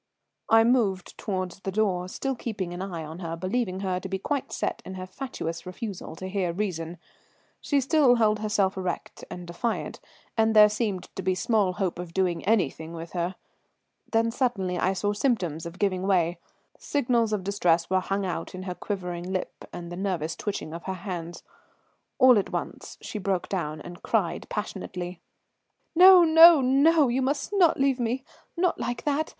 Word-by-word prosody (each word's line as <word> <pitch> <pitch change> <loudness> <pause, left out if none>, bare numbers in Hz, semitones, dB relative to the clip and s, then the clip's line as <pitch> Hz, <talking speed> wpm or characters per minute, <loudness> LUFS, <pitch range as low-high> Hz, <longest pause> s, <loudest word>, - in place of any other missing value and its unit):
I 225 0 +7
moved 225 -6 +1
towards 185 -3 -4
the 195 - -4
door, 185 -3 0
still 270 +7 -2
keeping 205 -8 -4
an 175 - -6
eye 175 -4 -4
on 160 +2 -8
her, 165 -2 -4
believing 185 +2 -2
her 185 -2 -1
to 190 - -7
be 190 - -1
quite 275 +7 -3
set - - -2
in 190 - -8
her 185 0 -6
fatuous 185 -6 -5
refusal 185 -2 -6
to 185 - -6
hear 190 -2 -1
reason. 175 -3 -3 0.6
She 285 - +1
still 275 -2 +4
held 215 -2 +2
herself 210 -3 +1
erect 185 -2 -4
and 180 0 -7
defiant, 175 +7 -3 0.4
and 220 0 +2
there 210 0 +9
seemed 210 -4 -3
to - - -4
be 185 0 0
small 205 -2 +1
hope 180 -2 -2
of 175 -1 -7
doing 180 -3 0
anything 170 -6 0
with 165 0 -7
her. 175 +1 -2 0.8
Then 230 0 +2
suddenly 200 -8 -1
I 190 - +2
saw 205 +2 -1
symptoms 180 - -1
of 170 +2 -10
giving 190 -1 0
way. 175 -3 +2 0.4
Signals 235 -5 +1
of 210 -3 -1
distress 175 -4 +2
were 190 0 +2
hung 195 +1 -2
out 180 -1 -4
in 185 - -6
her 185 -1 -4
quivering 180 -2 -5
lip 185 -1 -4
and 175 0 -7
the - - -5
nervous 180 -5 -2
twitching 195 -6 -4
of 170 - -8
her 190 - -3
hands. 175 -2 -6 0.7
All 255 -4 +7
at 195 - -3
once - - -5
she 210 - -5
broke 190 -2 -1
down 155 -5 -3
and 175 0 -10
cried 200 -7 -1
passionately: 180 -4 -5 0.7
"No, 365 +1 +9
no, 325 0 +9
no; 280 +4 +4
you 250 +2 0
must 280 +8 -1
not 360 -7 +4
leave 270 -1 +2
me 245 +2 -1 0.3
not 360 0 +1
like 240 -1 -3
that. 300 +2 0
190 Hz, 180 wpm, -26 LUFS, 180-230 Hz, 0.8 s, there